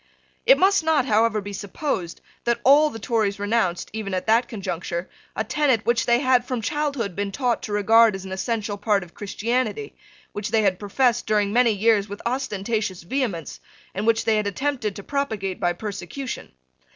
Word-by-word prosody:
It - - +8
must 390 -1 +4
not, 315 -5 +2
however, 220 -2 +2
be 200 +1 -7
supposed 195 - -4 0.2
that 235 0 +1
all 295 +3 +6
the 225 - -8
Tories 220 -3 0
renounced, 205 -4 -1
even 205 -3 -3
at 185 - -3
that 230 +2 +3
conjuncture, 175 -4 -4 0.3
a - - 0
tenet 270 -7 +1
which 235 -1 +1
they 240 0 +5
had 255 -2 +3
from 250 -2 -4
childhood 280 - -2
been 200 0 -2
taught 245 +1 0
to - - -6
regard 220 +1 +5
as 195 0 -7
an 190 - -8
essential 210 +1 -2
part 205 -1 +1
of 175 - -15
Christianity, 235 - -2 0.4
which 205 +1 -4
they 220 0 +2
had 190 -3 +1
professed 240 +4 +1
during 210 -1 +1
many 245 0 +4
years 215 -1 +2
with 205 +1 -7
ostentatious 215 -6 -2
vehemence, 195 - -3 0.3
and 205 +3 -3
which 230 0 +2
they 220 -1 +3
had 210 -1 0
attempted 230 -1 -2
to 200 - -8
propagate 220 -10 -2
by 175 - +1
persecution. 205 +7 -6
220 Hz, 180 wpm, -23 LUFS, 200-245 Hz, 0.4 s, It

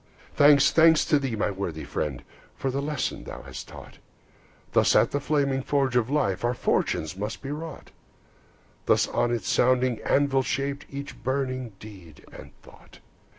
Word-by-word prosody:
Thanks, 145 0 +6
thanks 160 -1 +5
to 150 - +3
thee, 135 -5 -3
my 105 -1 0
worthy 90 -5 -5
friend, 70 -5 -4 0.3
For 135 - -2
the 140 +2 -2
lesson 145 -2 -3
thou 65 - -8
hast 65 -1 -9
taught! - - -12 0.7
Thus - - +3
at - - +4
the 145 - 0
flaming 140 -2 0
forge 135 -2 0
of 120 -1 +2
life 135 -11 0
Our 120 +1 +1
fortunes 80 -7 -1
must 105 +6 -5
be 135 - -5
wrought; 155 0 -7 1.0
Thus - - +3
on 120 - 0
its 115 -5 -2
sounding 125 -2 +2
anvil 140 -1 +2
shaped 140 +2 -3
Each 140 0 -7
burning 130 -3 -2
deed 95 -8 -13
and - - -11
thought. - - -17
130 Hz, 160 wpm, -26 LUFS, 110-140 Hz, 1.0 s, Thanks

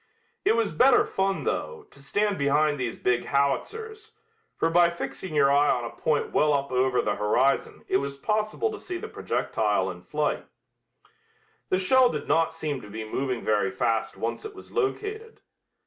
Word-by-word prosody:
It - - +3
was 225 -7 0
better 250 - +5
fun, 195 0 -1
though, 460 -3 -3
to 140 - -16
stand 205 +8 0
behind 145 +1 +2
these 125 -2 -3
big 120 -1 0
howitzers, 435 - -2 0.4
for 165 - +1
by 170 0 +5
fixing 170 0 -6
your 140 -2 +4
eye 145 +1 +4
on 120 -2 +1
a 115 - -5
point 150 -2 -1
well 150 0 +3
up 140 -1 -2
over 130 0 +2
the 105 - -1
horizon 120 +6 +1
it 190 - +3
was 140 -3 -4
possible 215 - -1
to 425 - -7
see 365 -1 -5
the 440 - -6
projectile - - -1
in - - -11
flight. - - -2 1.2
The 185 - +2
shell 250 +7 +4
did - - -4
not 165 0 +2
seem 155 -5 -4
to 105 - -12
be 110 +1 -6
moving 130 +1 -2
very 105 -3 +1
fast 110 +4 -1
once 115 - -3
it 430 -2 -8
was 390 - -13
located. 435 +1 -3
155 Hz, 180 wpm, -26 LUFS, -, 1.2 s, better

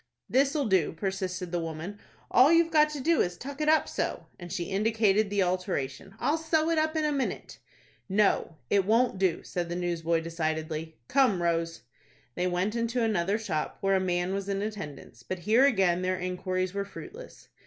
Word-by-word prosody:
"This'll 275 +2 +2
do," 190 -7 +2
persisted 185 -1 -3
the 175 - 0
woman. 165 +5 -5 0.3
"All 255 +6 +6
you've 335 0 +4
got 305 -1 +5
to 300 -1 -5
do 330 +5 +3
is 175 - 0
to - - -16
tuck 280 +3 -7
it 305 - +2
up 315 0 +4
so;" - - -3
and 175 -1 -9
she 185 -2 -2
indicated 215 +1 +2
the 200 -1 +2
alteration. 180 -2 -3
"I'll 310 +3 +1
sew 320 0 +1
it 325 - +2
up 315 +1 0
in 310 -1 +1
a 300 - +1
minute." 275 -2 -3 0.5
"No, 195 -4 +2 0.2
it 200 -1 +4
won't 225 0 +2
do," 185 -4 +1
said 175 -1 -3
the 175 - -3
newsboy, 170 -2 0
decidedly. 160 -1 -3
"Come, 255 -9 +3
Rose." 165 -1 -1 0.5
They 180 +6 -1
went 180 +4 0
into 235 +1 0
another 200 -2 +1
shop, 175 -9 -3
where 195 0 +2
a - - +3
man 180 0 0
was 195 0 -3
in 200 0 -1
attendance; 155 - -7
but 185 +9 -5
here 220 +9 +4
again 190 -8 +2
their 185 0 0
inquiries 185 0 -2
were 200 0 -1
fruitless. 420 - -11
195 Hz, 190 wpm, -28 LUFS, 175-245 Hz, 0.5 s, All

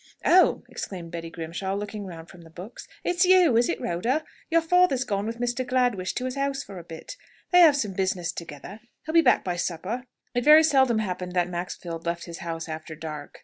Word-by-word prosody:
"Oh!" 370 +1 +5
exclaimed 175 -4 -7
Betty 165 -1 -6
Grimshaw, 170 +4 -4
looking 205 0 -5
round 165 -2 -9
from 180 - -14
the 165 - -15
books. 180 +7 -10 0.2
"It's 355 +1 +2
you, 360 -7 +5
is 235 +1 +3
it, - - -1
Rhoda? 235 - -1 0.3
Your 330 0 +4
father 360 -2 +4
is 260 - -1
gone 200 -2 -2
with 230 +1 -4
Mr. 245 +1 -1
Gladwish 245 -7 0
to 250 - -2
his 255 - -3
house 275 0 -1
for 190 -2 -9
a - - -10
bit. 165 - -9 0.3
They 360 - +6
have 320 -5 +8
some 215 -9 -1
business 185 -2 -1
together. 170 +4 -9 0.3
He'll 315 - -4
be 335 - +7
back - - +3
by 175 -1 -2
supper." 190 +9 -3 0.3
It 245 0 0
very 305 +3 +8
seldom 265 -6 +3
happened 180 -4 -3
that 180 -1 +1
Maxfield 175 -1 -5
left 170 0 -2
his 170 -1 -8
house 165 -1 -5
after 155 0 -7
dark. 150 -2 -8
195 Hz, 215 wpm, -26 LUFS, 170-260 Hz, 0.3 s, have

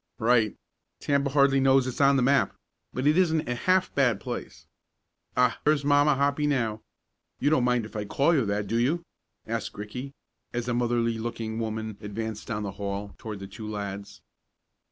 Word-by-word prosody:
"Right. 115 -2 +3 0.4
Tampa 140 -1 +1
hardly 140 -1 +4
knows 135 -1 +4
it's 130 +2 -3
on 140 0 +6
the 130 - +3
map, 135 0 +3 0.4
but 130 - -3
it 155 +4 +4
isn't 160 -4 +2
a 125 - 0
half 185 +9 +1
bad 125 -7 +2
place. - - -6 0.7
Ah, 125 -2 +3
here's 150 -1 +2
Mamma 145 0 +4
Hoppy 140 +2 +1
now. 115 -6 0 0.6
You 145 - +1
don't 130 -5 +3
mind 125 -2 +2
if 110 - -12
I 105 -1 -2
call 140 +10 +2
you 140 -6 +3
that; 100 0 -1
do 115 +4 0
you?" 155 +8 +1 0.4
asked 115 -2 -4
Ricky, 125 +7 -6 0.4
as 120 0 -2
a 120 - 0
motherly 120 -1 +1
looking 110 -1 -4
woman 110 -2 -4
advanced 110 +1 -5
down 105 -2 -2
the 100 - -3
hall 100 0 -4
toward 110 -2 -6
the 100 - -8
two 105 +3 -8
lads. 100 -1 -6
120 Hz, 180 wpm, -27 LUFS, 110-140 Hz, 0.7 s, on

